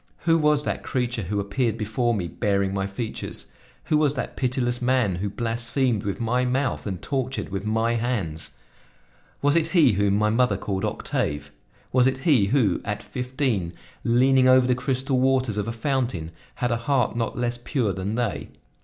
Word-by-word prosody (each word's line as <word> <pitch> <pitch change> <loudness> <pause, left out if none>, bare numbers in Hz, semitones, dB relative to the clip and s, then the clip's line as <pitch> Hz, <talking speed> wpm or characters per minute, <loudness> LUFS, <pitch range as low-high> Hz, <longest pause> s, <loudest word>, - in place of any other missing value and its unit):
Who 165 -1 +3
was 150 -1 +3
that - - -2
creature 125 -2 -2
who 100 +2 -2
appeared 110 +3 -1
before 115 +2 0
me 90 -4 -2
bearing 100 +1 0
my 95 0 -1
features? 110 +3 -6 0.3
Who 155 - +2
was 150 -2 +2
that - - -4
pitiless 125 -1 0
man 125 -7 +2
who 100 +3 -2
blasphemed 115 +1 0
with 100 -1 -3
my 120 +2 +1
mouth 125 -1 -1
and 95 -3 -3
tortured 130 +2 -3
with 100 +1 -4
my 110 +2 +1
hands? 110 -10 -3 0.9
Was 145 +2 +3
it 165 -1 +3
he 165 -7 +5
whom 100 0 +2
my 105 +1 +2
mother 115 -3 +2
called 95 -1 -3
Octave? 75 0 -2 0.4
Was 125 0 +4
it 130 0 +1
he 130 - +3
who, 110 -6 +2
at - - -4
fifteen, 125 - -2 0.3
leaning 130 +2 +4
over 130 0 +6
the 125 - +3
crystal 130 +1 -1
waters 130 -4 +2
of 105 0 -1
a - - -1
fountain, 115 - -2 0.2
had 125 0 -1
a 115 - +1
heart 125 -1 0
not 115 -2 -2
less 120 0 -1
pure 120 -7 0
than 95 +4 -3
they? 115 -10 -2
120 Hz, 180 wpm, -24 LUFS, 100-130 Hz, 0.9 s, over